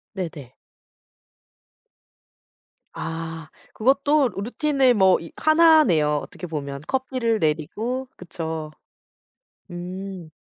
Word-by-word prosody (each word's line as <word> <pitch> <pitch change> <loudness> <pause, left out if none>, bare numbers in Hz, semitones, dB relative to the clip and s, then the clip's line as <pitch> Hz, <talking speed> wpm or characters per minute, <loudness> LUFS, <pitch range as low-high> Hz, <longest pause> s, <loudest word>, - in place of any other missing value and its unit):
네네. 155 -9 -6 2.4
아 165 -1 -6 0.2
그것도 275 +3 +3
루틴의 260 +4 +2
뭐 190 -3 +4
이 170 - -10
1 315 0 +6
네요 150 - +2
어떻게 180 - -9
보면. 140 -3 -5
커피를 255 -4 0
내리고 180 - -1
그쵸. 160 -3 -5 1.0
음. 180 -1 -7
185 Hz, 155 characters per minute, -23 LUFS, 160-260 Hz, 2.4 s, 1